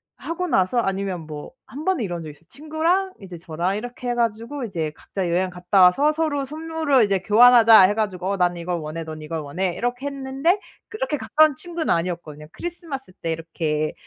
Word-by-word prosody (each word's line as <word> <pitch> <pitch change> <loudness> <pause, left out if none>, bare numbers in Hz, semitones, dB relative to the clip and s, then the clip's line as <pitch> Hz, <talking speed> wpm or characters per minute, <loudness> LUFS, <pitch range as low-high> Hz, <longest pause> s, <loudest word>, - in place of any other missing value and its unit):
하고 350 +2 -4
나서 190 - +1
아니면 195 -4 -1
뭐 150 -1 -8
한번은 310 0 -2
이런 175 -4 -4
적이 155 -2 -7
있어요. 150 - -20
친구랑 325 - -1
이제 185 -3 -9
저랑 170 +3 -2
이렇게 245 +3 -5
해 240 - 0
가지고 235 +4 -2
이제 165 -9 -3
"각자 190 -3 -4
여행 185 +2 +1
갔다 180 +2 +1
와서 275 +13 +5
서로 300 -3 -1
선물을 310 -2 +1
이제 200 -2 +1
교환하자." 225 +2 +7
해 190 +2 +5
가지고 195 -3 -2
"난 175 -1 +2
이걸 175 +1 -3
원해, 155 +1 -5
넌 155 -1 -8
이걸 160 +1 -4
원해." 175 +5 -2
이렇게 245 +3 -3
했는데 275 +6 0 0.3
그렇게 435 -8 -3
가까운 310 +1 +3
친구는 340 +2 -4
아니었거든요. 165 -3 -4
크리스마스 330 - -7
때 165 -2 -4
이렇게 160 -2 -2
205 Hz, 415 characters per minute, -23 LUFS, 175-285 Hz, 0.3 s, 교환하자